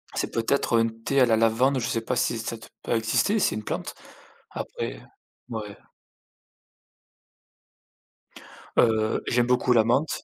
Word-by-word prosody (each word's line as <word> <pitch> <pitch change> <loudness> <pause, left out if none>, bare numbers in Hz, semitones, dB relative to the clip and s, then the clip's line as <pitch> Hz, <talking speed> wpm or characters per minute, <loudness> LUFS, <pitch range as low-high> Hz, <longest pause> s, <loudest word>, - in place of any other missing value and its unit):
C'est - - -2
peut-être 115 +1 +1
un 115 - +3
thé 115 +5 -1
à - - +7
la 110 -1 +3
lavande, 125 +4 +2
je 115 - -2
sais 115 - -1
pas 125 +2 -2
si 115 0 0
ça 115 +1 -4
doit 115 - -14
pas 115 - 0
exister, 115 - +1
c'est - - +2
une 110 - -5
plante. - - -4 0.6
Après, - - -5
heu, - - -14 0.5
mouais. 105 -3 -6 3.0
Heu, 110 -2 +3
j'aime 120 0 +2
beaucoup 125 0 +3
la 115 -2 +5
menthe. 135 +7 0
115 Hz, 150 wpm, -25 LUFS, 110-125 Hz, 3.0 s, à